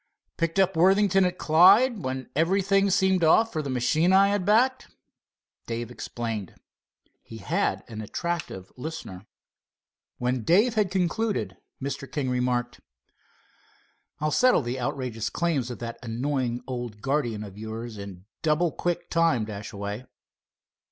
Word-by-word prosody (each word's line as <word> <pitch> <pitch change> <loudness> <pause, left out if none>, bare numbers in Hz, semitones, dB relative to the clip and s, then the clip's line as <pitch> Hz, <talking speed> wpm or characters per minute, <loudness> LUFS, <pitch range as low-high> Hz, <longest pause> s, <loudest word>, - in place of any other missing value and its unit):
"Picked 165 +2 -1
up 190 -1 +3
Worthington 195 +2 +4
at 180 0 -1
Clyde, 195 +8 +5
when 130 0 -4
everything 195 +5 +2
seemed 190 -1 +2
off 225 +8 +4
for 155 - -1
the 140 - -5
machine 155 +7 +2
I 200 +1 +5
backed." 225 +7 +2 0.8
Dave 115 0 -4
explained. 115 -5 -5 0.7
He 115 - -11
had 170 - -1
an 110 -2 -7
attentive 150 - -4
listener. 125 - -7 0.9
When 125 0 -1
Dave 205 - +3
had 210 -4 +1
concluded, 185 - -1 0.2
Mr. 140 -1 -5
King 135 -4 -2
remarked: 125 -1 -1 1.4
"I'll 155 0 0
settle 250 - +4
the 120 +2 -3
outrageous 125 -4 -3
claims 155 -8 -1
of 120 - -6
that 115 0 -6
annoying 125 +1 -2
old 120 -5 -6
guardian 135 -7 -1
of 100 -2 -10
yours 110 +1 -7
in 95 -2 -9 0.2
double 160 +2 +2
quick 175 +2 -2
time, 165 -10 +2
Dashaway." 105 +2 -6
140 Hz, 130 wpm, -26 LUFS, 120-180 Hz, 1.4 s, Clyde